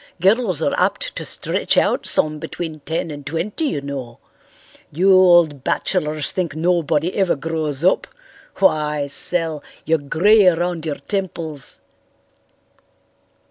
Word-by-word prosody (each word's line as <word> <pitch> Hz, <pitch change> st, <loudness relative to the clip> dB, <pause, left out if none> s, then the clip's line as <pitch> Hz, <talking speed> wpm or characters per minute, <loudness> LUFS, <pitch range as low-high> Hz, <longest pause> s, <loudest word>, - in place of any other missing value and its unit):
Girls 190 Hz, -, +2 dB
are 140 Hz, -, 0 dB
apt -, -, -1 dB
to -, -, -5 dB
stretch -, -, 0 dB
out -, -, +2 dB
some 155 Hz, 0 st, +4 dB
between 160 Hz, 0 st, -6 dB
ten 160 Hz, +3 st, -4 dB
and 145 Hz, -1 st, -8 dB
twenty, 165 Hz, -, -3 dB
you 150 Hz, -, -2 dB
know. 135 Hz, -4 st, -7 dB, 0.7 s
You 185 Hz, +6 st, +3 dB
old 175 Hz, -7 st, +4 dB
bachelors 155 Hz, -5 st, -1 dB
think 170 Hz, -5 st, -3 dB
nobody 165 Hz, 0 st, 0 dB
ever 190 Hz, -3 st, +1 dB
grows 155 Hz, -1 st, -3 dB
up. 185 Hz, -, +2 dB, 0.5 s
Why, 150 Hz, -5 st, +1 dB
Sel, 160 Hz, +1 st, 0 dB, 0.2 s
you're 160 Hz, 0 st, +2 dB
grey 190 Hz, +8 st, +3 dB
around 175 Hz, -1 st, 0 dB
your 150 Hz, -, -2 dB
temples." 165 Hz, -8 st, -5 dB
160 Hz, 125 wpm, -20 LUFS, 150-180 Hz, 0.7 s, some